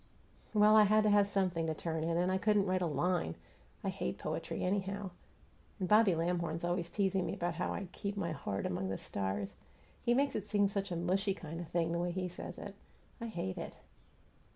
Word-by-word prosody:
"Well, 210 +1 +7
I 215 -1 +8
had 215 +1 +4
to 210 - +4
have 205 -1 +5
something 185 -5 0
to 160 - -1
turn 160 0 -2
in, 165 +1 +1
and 180 +2 +2
I 190 - +1
couldn't 205 -1 +3
write 185 -1 +1
a 175 - +2
LINE! 170 - 0 0.5
I - - 0
hate 65 - -3
poetry, - - -3
anyhow; 195 +1 -1 0.7
and 185 - -1
Bobby 210 -2 +6
Lamhorn's 170 0 -1
always 175 0 0
teasing 195 -2 +1
me 170 - -2
about 175 -3 -1
how 175 - -2
I 200 - -3
'keep 200 +2 -4
my 170 -4 -1
heart 100 -10 -3
among 95 +1 -1
the 95 - -2
stars.' 100 0 -3 0.5
He 240 - +3
makes 275 +1 +2
it 210 - -1
seem 205 -1 +2
such 200 0 -2
a - - -1
mushy 190 +3 +1
kind 165 -3 -7
of 175 - -5
thing, 165 0 0
the 170 - 0
way 175 +1 0
he 180 +1 -2
says 180 0 -7
it. 200 - -7 0.5
I 230 - -3
hate 170 - -3
it!" - - -6
180 Hz, 215 wpm, -34 LUFS, 165-200 Hz, 0.7 s, I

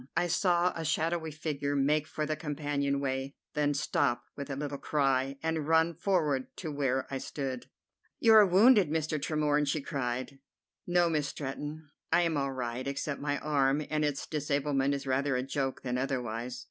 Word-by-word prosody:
I - - +3
saw 175 0 +2
a 165 - -4
shadowy 160 +1 0
figure 145 -2 -3
make 150 +2 +2
for 155 - -3
the 155 +1 -1
companion 145 -2 -1
way, 135 0 -2 0.2
then 145 -1 +1
stop 140 -3 0
with 140 0 -6
a 135 - -2
little 140 0 -4
cry, 135 -2 +1
and 160 -2 -1
run 160 +1 +4
forward 155 -7 0
to 160 -4 -4
where 135 -2 0
I 135 - -1
stood. 130 -3 -5 0.5
"You 225 - +6
are 215 -1 +9
wounded, 200 - +6
Mr. 155 -1 -1
Tremorne!" 150 -1 +1
she 145 +2 +1
cried. 135 -1 -3 0.5
"No, 175 -1 +3
Miss 150 -3 0
Stretton, 145 +2 -6 0.2
I 175 - +4
am 165 -2 0
all 140 -1 0
right, 125 0 -4
except 140 +1 -3
my 145 0 0
arm, 145 0 +1
and 155 0 +1
its 145 -2 -1
disablement 140 -2 0
is 140 0 -5
rather 135 +1 +1
a 125 - 0
joke 135 0 -2
than 125 -1 -1
otherwise." 125 -2 -3
145 Hz, 175 wpm, -30 LUFS, 135-155 Hz, 0.5 s, are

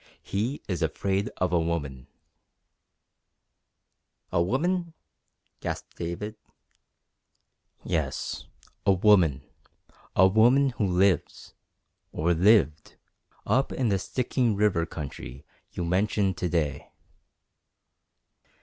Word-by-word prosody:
He 115 +9 -3
is 90 -5 -3
afraid 100 +1 -1
of 90 -1 0
a 85 - +4
woman!" 75 -6 -3 2.2
"A 85 - +2
woman!" 170 - 0 0.6
gasped - - -6
David. 95 +6 -5 1.5
"Yes, 75 -5 -3 0.4
a 100 - +4
woman 90 -8 +4 0.7
a 95 - +6
woman 120 +7 +4
who 110 -4 -1
lives 95 +1 +1 0.6
or 85 +3 +1
lived 85 -4 +3 0.5
up 135 +1 +1
in 125 -4 0
the 100 -2 +1
Stikine 125 0 0
River 100 -5 +1
country 70 -3 -8 0.3
you 90 - -3
mentioned 95 +1 +1
to 90 - -1
day." 80 -4 -1
95 Hz, 95 wpm, -27 LUFS, 85-110 Hz, 2.2 s, a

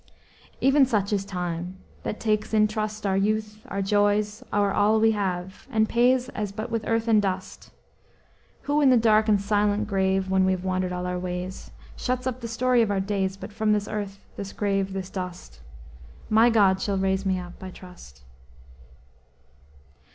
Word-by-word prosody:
"Even 275 +1 +5
such 210 -6 +1
is 200 -1 0
Time, 180 -1 -4 0.2
that 210 - -4
takes 215 0 0
in 215 0 +5
trust, 215 -1 -4
Our 195 -1 +1
youth, 215 +2 -1
our 195 0 -2
joys, 205 +3 +1
our 205 -1 +2
all 215 +2 +3
we 225 0 +4
have, 190 -2 -3
And 220 -1 +2
pays 245 +2 +3
as 210 -2 -4
but 215 +4 -6
with 230 -1 -2
earth 225 0 0
and 220 -2 +5
dust; 190 -1 -4 0.9
Who 290 +1 +1
in 280 - +5
the 255 - +6
dark 220 -1 +4
and 205 -1 +4
silent 205 +1 +1
grave, 190 -1 +1
When 190 0 +2
we 190 0 +3
have 185 -1 -4
wandered 185 -1 -1
all 180 0 -3
our 180 0 -2
ways, 180 +1 -5 0.3
Shuts 255 0 -2
up 255 -1 -3
the 235 - -4
story 245 +2 +2
of 225 - +1
our 200 -1 0
days; 190 -1 -1
But 195 +2 -9
from 215 0 +1
this 210 -1 -1
earth, 205 -2 -4 0.2
this 200 -1 -6
grave, 195 -2 -1
this 190 -1 -5
dust, 180 - -7 0.7
My 225 +2 +6
God 195 -4 +3
shall 200 -1 -1
raise 190 0 0
me 190 -2 0
up, 180 -1 -9
I 190 - -6
trust!" 180 - -14
205 Hz, 180 wpm, -25 LUFS, 190-220 Hz, 0.9 s, the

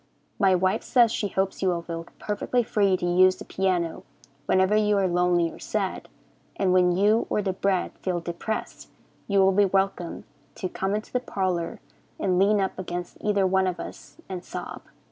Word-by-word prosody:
My 190 -2 +4
wife 185 +1 +1
says 240 -3 +4
she 210 - -1
hopes 190 0 -2
you 190 - +1
will 170 -1 -1
feel 165 0 -6
perfectly 215 +4 -1
free 200 -4 +2
to 175 - -3
use 185 +1 +5
the - - -10
piano 180 -3 -1 0.5
whenever 190 +2 +3
you 210 -1 +3
are 195 -1 +2
lonely 175 -1 +2
or - - -13
sad, 200 -3 -3 0.5
and 190 -2 +1
when 180 -1 +4
you 210 +4 +3
or 210 - 0
the 190 -1 -1
bread 190 -1 0
feel 180 -2 -1
depressed 175 +6 -5 0.4
you 200 - +1
will 190 0 +5
be 200 +1 +4
welcome 190 -3 -1 0.3
to 185 - -3
come 190 +2 -2
into 215 - -6
the 250 - +2
parlor 185 -8 -2 0.4
and 185 -2 +1
lean 205 +2 +4
up 190 -1 -2
against 175 -1 -5
either 205 -2 +2
one 190 0 +2
of 180 -1 -3
us - - -9
and 185 -2 -6
sob. - - -7
190 Hz, 185 wpm, -25 LUFS, 180-200 Hz, 0.5 s, use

